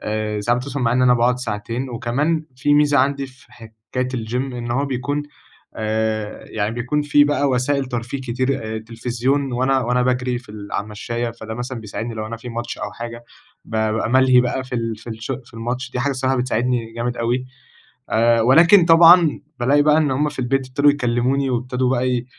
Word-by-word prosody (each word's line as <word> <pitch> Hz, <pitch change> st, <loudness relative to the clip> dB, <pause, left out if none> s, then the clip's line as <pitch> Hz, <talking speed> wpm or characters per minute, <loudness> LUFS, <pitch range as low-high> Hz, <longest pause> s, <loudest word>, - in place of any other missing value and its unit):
آآ 105 Hz, 0 st, -2 dB
ساعات 120 Hz, +4 st, +1 dB
بتوصل 140 Hz, +2 st, -5 dB
معايا 115 Hz, 0 st, +2 dB
إن 130 Hz, -, +3 dB
أنا 125 Hz, -1 st, +5 dB
باقعد 120 Hz, +1 st, +2 dB
ساعتين، 115 Hz, +2 st, -4 dB
وكمان 135 Hz, +7 st, -1 dB
في 145 Hz, +3 st, +2 dB
ميزة 145 Hz, -1 st, +4 dB
عندي 140 Hz, +1 st, +1 dB
في 130 Hz, -1 st, -20 dB
حكاية 115 Hz, +2 st, -6 dB
الGYM 115 Hz, -1 st, -4 dB, 0.2 s
إن 120 Hz, -1 st, -5 dB
هو 135 Hz, +4 st, +1 dB
بيكون 140 Hz, +3 st, -2 dB, 0.5 s
آآ، 110 Hz, -1 st, -2 dB
يعني 110 Hz, +1 st, -2 dB
بيكون 125 Hz, +5 st, -1 dB
فيه 145 Hz, 0 st, +4 dB
بقى 145 Hz, -1 st, +1 dB
وسائل 135 Hz, +2 st, +1 dB
ترفيه 120 Hz, +2 st, -4 dB
كتير، 120 Hz, -3 st, -2 dB
تلفزيون، 125 Hz, +4 st, -2 dB
وأنا 130 Hz, +2 st, +2 dB
وأنا 125 Hz, +1 st, +1 dB
باجري 125 Hz, 0 st, 0 dB
في 125 Hz, -2 st, -18 dB
ال 105 Hz, -1 st, -9 dB
على -, -, -1 dB
المشاية، 115 Hz, +3 st, -4 dB
فده 110 Hz, -1 st, -8 dB
مثلًا 120 Hz, 0 st, -5 dB
بيساعدني، 110 Hz, +2 st, -5 dB
لو 110 Hz, -1 st, -4 dB
أنا 115 Hz, +1 st, -6 dB
في 120 Hz, +2 st, -10 dB
ماتش 120 Hz, 0 st, -5 dB
أو -, -, -5 dB
حاجة، 120 Hz, 0 st, -8 dB, 0.4 s
بابقى 110 Hz, 0 st, -1 dB
ملهي 130 Hz, 0 st, +5 dB
بقى 125 Hz, +1 st, -2 dB
في 130 Hz, -1 st, -7 dB
ال 115 Hz, -2 st, -2 dB
في 115 Hz, +2 st, -10 dB
الش 110 Hz, +3 st, -5 dB
في 115 Hz, -, -19 dB
الماتش، 125 Hz, +3 st, -4 dB
دي 125 Hz, -, -3 dB
حاجة 140 Hz, +3 st, 0 dB
الصراحة 130 Hz, 0 st, 0 dB
بتساعدني 125 Hz, -2 st, -1 dB
جامد 120 Hz, +1 st, -3 dB
أوي، 120 Hz, +2 st, -1 dB, 0.6 s
آآ 115 Hz, +1 st, +3 dB
ولكن 170 Hz, -, +6 dB
طبعًا 165 Hz, -1 st, +6 dB, 0.2 s
بالاقي 140 Hz, +4 st, +4 dB
بقى 150 Hz, 0 st, +4 dB
إن 150 Hz, -3 st, +2 dB
هم 145 Hz, +3 st, +1 dB
في -, -, -9 dB
البيت 130 Hz, +1 st, 0 dB
ابتدوا 140 Hz, +3 st, +4 dB
يكلموني، 130 Hz, 0 st, 0 dB
وابتدوا 125 Hz, +1 st, -1 dB
بقى 125 Hz, -1 st, 0 dB
125 Hz, 190 wpm, -20 LUFS, 115-135 Hz, 0.6 s, ولكن